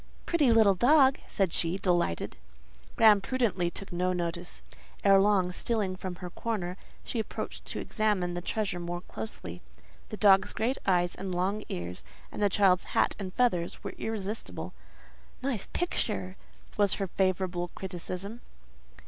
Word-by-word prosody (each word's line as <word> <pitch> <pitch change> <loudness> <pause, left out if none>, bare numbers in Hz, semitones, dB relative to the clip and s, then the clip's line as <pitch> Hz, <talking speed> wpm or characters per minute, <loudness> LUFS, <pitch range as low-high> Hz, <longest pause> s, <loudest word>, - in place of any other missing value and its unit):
"Pretty 300 -8 +3
little 220 -3 +6
dog!" 265 - +5
said 190 -4 0
she, 170 +2 0
delighted. 175 - 0 0.6
Graham 215 -3 +7
prudently 205 -7 0
took 195 +2 -8
no 180 +1 +1
notice. 175 0 -3 0.4
Ere 195 -1 +7
long, 195 -3 +3
stealing 200 -1 -1
from 185 -1 -5
her 180 0 -7
corner, 185 -6 -3 0.3
she 235 - -3
approached 220 - -5
to - - -4
examine 205 -5 0
the 175 - -3
treasure 200 -1 -2
more 175 0 -4
closely. 95 - -7 0.5
The 215 - -5
dog's 195 -2 +5
great 245 +5 0
eyes 175 -2 +3
and 190 -2 -4
long 195 +4 0
ears, 90 +1 -5 0.3
and - - -6
the 205 - +4
child's 185 -2 +4
hat - - +3
and 190 -2 -4
feathers, 185 -7 0
were - - -5
irresistible. 215 -1 -4 0.7
"Nice 255 -7 -2
picture!" 210 - -1 0.4
was 205 -2 +4
her 195 - -1
favourable 185 -1 0
criticism. 190 +4 -5
190 Hz, 145 wpm, -29 LUFS, 175-215 Hz, 0.7 s, Graham